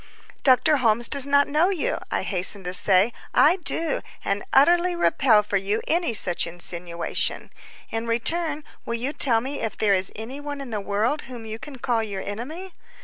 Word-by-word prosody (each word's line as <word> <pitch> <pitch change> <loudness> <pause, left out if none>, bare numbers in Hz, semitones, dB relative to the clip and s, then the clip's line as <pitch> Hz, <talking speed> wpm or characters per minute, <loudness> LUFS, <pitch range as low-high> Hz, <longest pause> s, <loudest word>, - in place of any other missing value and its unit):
"Dr. 270 +3 +4
Holmes 235 -2 +2
does 280 -1 +1
not 285 0 +3
know 310 +5 +2
you," 365 -7 -2
I - - -2
hastened 190 0 +2
to 180 - -3
say; 195 +4 +3 0.2
"I 335 +5 +5
do, 330 -3 -1 0.2
and 200 +1 -1
utterly 345 +5 +4
repel 250 -10 +3
for 205 -1 -1
you 200 +3 -1
any 340 -2 +1
such 175 -5 +3
insinuation. 170 0 -3 0.4
In 225 +1 -3
return, 305 +6 -1 0.2
will 235 - -3
you 255 +5 -3
tell 235 -7 +3
me 275 +4 -5
if 225 - -4
there 205 -2 +2
is 190 0 +3
any 240 +6 -7
one 290 -1 -6
in 270 -3 -8
the 210 -2 -3
world 215 +9 -1
whom 240 -3 -9
you 220 0 -6
can 285 0 -10
call 240 -2 -1
your 200 -3 -5
enemy? 310 - -7
235 Hz, 185 wpm, -23 LUFS, 205-290 Hz, 0.4 s, I